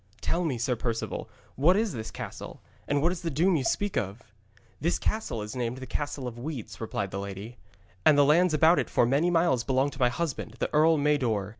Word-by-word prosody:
'Tell 175 - 0
me,' 145 -7 -1
said 120 0 -1
Perceval, 115 -2 -3 0.3
'what 170 +8 +4
is 220 -2 0
this 110 -3 -5
castle, - - -8 0.3
and 145 0 +1
what 170 - +3
is 180 -1 -5
the 170 - -2
doom 170 +5 +2
you 140 - 0
speak 205 +8 -1
of?' 100 +3 -3 0.6
'This 170 - +1
castle 215 - -2
is 105 +3 -7
named 125 0 -2
the 130 - -7
Castle 140 0 -4
of 120 -1 -7
Weeds,' 130 -5 -6
replied 100 -3 -3
the 100 - -4
lady, 100 +4 -7 0.4
'and 145 - +6
the 145 - +6
lands 160 +3 +4
about 160 +3 +5
it - - -2
for - - +3
many 140 +8 +2
miles 165 -8 +2
belonged 135 +3 +1
to 135 - -12
my 125 -1 +4
husband, 125 -5 -4
the - - -3
Earl 160 +1 +5
Mador. 130 -9 +1
140 Hz, 215 wpm, -28 LUFS, 120-165 Hz, 0.6 s, and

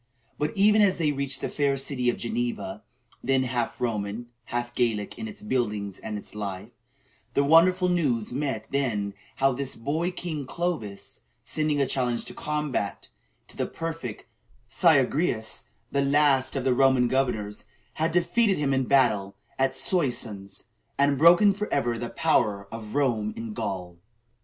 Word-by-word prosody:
But 150 +4 -2
even 210 +2 +5
as 195 -2 +4
they 155 -3 +1
reached 140 -1 -1
the - - -1
fair 140 -2 +1
city 135 -2 0
of 120 - -1
Geneva 225 -2 -3 0.4
then 135 -1 +2
half 120 -2 -2
Roman, 110 0 -3 0.2
half 120 +1 -3
Gallic, 115 -5 0
in 225 - -4
its 210 -1 -11
buildings 105 - -2
and 110 -1 -5
its 105 - -9
life 100 +1 -5 0.6
the 140 - +4
wonderful 180 +5 +5
news 135 -11 +1
met 130 -5 -3
them 110 -8 -1 0.2
how 135 0 +3
this 135 +1 -3
boy 155 +9 -1
king 165 -5 -5
Clovis, 130 - -4 0.2
sending 155 -2 0
a 140 - +3
challenge 125 -2 -1
to - - -5
combat 150 -9 -3 0.4
to - - -13
the - - -1
prefect 165 -9 -5 0.4
Syagrius, 135 -5 +2 0.3
the 140 - +1
last 140 -1 +3
of 135 - -1
the 130 -1 +3
Roman 130 -1 +4
governors, 110 -7 -1 0.3
had 160 +1 0
defeated 180 +5 +2
him 140 -2 +1
in 130 - +2
a - - -2
battle 110 -8 +2 0.2
at 135 0 +2
Soissons, 110 - -1 0.3
and 140 0 +3
broken 175 +7 +6
forever 140 - -1
the 120 0 -4
power 105 -11 +1
of 110 0 -7
Rome 115 -7 +1
in 115 -1 -5
Gaul. 95 -6 -4
135 Hz, 155 wpm, -26 LUFS, 115-155 Hz, 0.6 s, broken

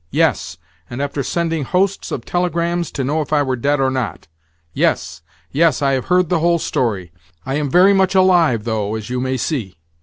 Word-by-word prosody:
Yes, 80 +1 0 0.3
and 120 - -6
after 140 0 -2
sending 165 +2 -1
hosts 190 +7 0
of 120 - -4
telegrams 175 -1 -1
to 135 - -2
know 150 +4 0
if 150 - -6
I 150 -1 +3
were 130 -2 -1
dead 140 +4 0
or 135 -1 +2
not! 130 -4 -4 0.5
Yes, - - 0 0.3
yes, 155 -1 +2
I 135 - +3
have 130 -1 -1
heard 180 -1 +2
the 175 0 +1
whole 170 +1 +3
story. 105 - -2 0.3
I 135 - -3
am 145 0 -1
very 185 +7 +5
much 190 0 +2
alive, 175 - +4
though, 110 -2 -2
as 110 +2 -6
you 125 - -1
may 130 0 -1
see." 115 - -3
145 Hz, 200 wpm, -18 LUFS, 125-170 Hz, 0.5 s, very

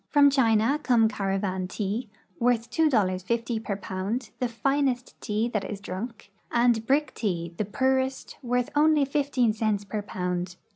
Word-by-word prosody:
From 285 -1 +6
China 235 +1 +3
come 235 -5 +4
caravan 195 -2 -2
tea, 210 +5 -3 0.3
worth 235 -1 +1
$2.50 230 - +1
per 200 - -2
pound, 205 +5 -4
the 250 - +1
finest 260 +1 0
tea 215 +2 0
that 210 -4 -1
is 205 - -5
drunk, 205 +2 -7 0.2
and 235 -2 +3
brick 295 +2 +2
tea, 170 -6 -2
the 215 - -1
poorest, 265 +4 -1
worth 250 0 -1
only 300 -1 +4
15 275 -5 +1
cents 215 -2 0
per 210 +1 -3
pound. 180 -2 -3
230 Hz, 145 wpm, -26 LUFS, 200-260 Hz, 0.3 s, From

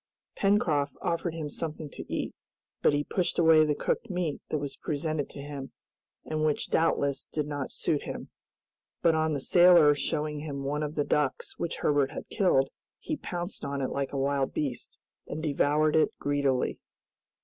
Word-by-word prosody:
Pencroft 160 -8 +2
offered 170 -1 -1
him 160 -2 -3
something 155 +1 -4
to - - -9
eat, - - -2 0.5
but - - +5
he 145 - +1
pushed 180 +3 -1
away 160 -2 +6
the 150 -1 +1
cooked 235 - -1
meat 180 -5 -2
that 155 - 0
was 145 -1 -4
presented 155 -1 -2
to 140 - -8
him 140 -2 -7 0.5
and 155 0 -2
which 155 -1 0
doubtless 140 -4 +1
did 150 -1 -2
not 145 -2 -4
suit - - 0
him. - - -7 0.7
But 165 - +5
on 160 0 +1
the 145 - -1
sailor 175 0 +7
showing 150 +1 -2
him 145 -2 -5
one 145 +2 -1
of 150 0 -3
the 145 - +2
ducks 150 -3 -1
which 170 - -2
Herbert 145 -2 +3
had - - -7
killed, 155 -10 +2 0.3
he 310 - -3
pounced 175 -8 -5
on 140 0 -2
it 130 - -1
like 140 -1 -2
a 140 - -3
wild 135 0 0
beast, 135 -5 -3 0.3
and 155 - -5
devoured 150 +1 +2
it 160 - +4
greedily. 140 -3 0
150 Hz, 175 wpm, -29 LUFS, 140-160 Hz, 0.7 s, sailor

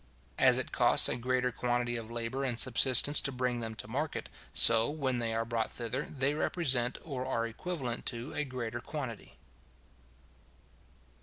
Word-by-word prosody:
As - - +5
it - - -2
costs - - +4
a - - -2
greater 125 +1 -1
quantity 120 0 -1
of 115 -1 -6
labour 120 +3 -4
and 125 -4 -2
subsistence 130 +3 +5
to 140 - -2
bring 125 -1 -2
them 110 -1 -5
to 110 - -8
market, 145 +7 -4 0.2
so, 115 +1 +5
when 135 -5 -2
they 115 -1 -2
are 115 0 -1
brought 115 -1 -2
thither 120 +3 -4
they 135 0 -1
represent, 135 -6 0
or 135 -5 -5
are 115 -3 -1
equivalent 125 +1 -4
to 120 +3 -4
a 150 - -1
greater 120 -3 -5
quantity. 130 -5 -7
125 Hz, 160 wpm, -31 LUFS, 115-135 Hz, 0.2 s, As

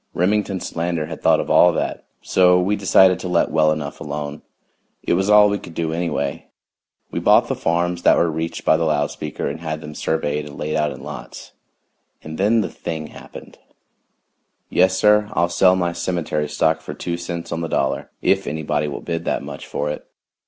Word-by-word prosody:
Remington 100 +1 +1
Solander 85 -2 -2
had 80 0 -8
thought - - +4
of - - -3
all 90 - +6
that. - - -3 0.2
So 90 -1 +4
we 95 +3 +1
decided 95 -2 +4
to 90 - -5
let 90 -1 +1
well 80 -1 +3
enough 75 -2 -4
alone 75 0 -5 0.6
it - - +1
was 95 +3 +1
all 105 0 +7
we 100 0 -1
could 85 - -12
do 80 -1 -2
anyway. 80 -5 -2 0.6
We - - -2
bought - - +4
the - - -1
farms 85 +1 -1
that - - +5
were 85 -1 +2
reached 80 +1 -4
by 80 - +5
the 85 - -1
loud 75 -2 +1
speaker 75 -1 -5
and 75 +3 -4
had 80 -2 -4
them 75 -1 -9
surveyed 75 -1 -2
and 70 - -11
laid 75 0 -3
out 75 -1 +1
in 65 - -10
lots - - -9 0.7
and 80 +2 -8
then 110 +4 +3
the - - -3
thing 80 -3 -5
happened! - - -12 1.1
Yes, 95 +1 +3
sir, 105 0 +4
I'll 85 - +1
sell 90 +1 +4
my 90 -2 -1
cemetery 85 -4 -2
stock 80 +2 +1
for 75 -2 -7
two 85 +3 -3
cents 85 0 -6
on 85 - -2
the 85 - -2
dollar, - - -1
if - - +2
anybody 75 0 -1
will 75 - -5
bid 85 -1 -3
that - - -1
much - - -8
for 75 +1 -2
it. - - -8
85 Hz, 200 wpm, -21 LUFS, 75-90 Hz, 1.1 s, all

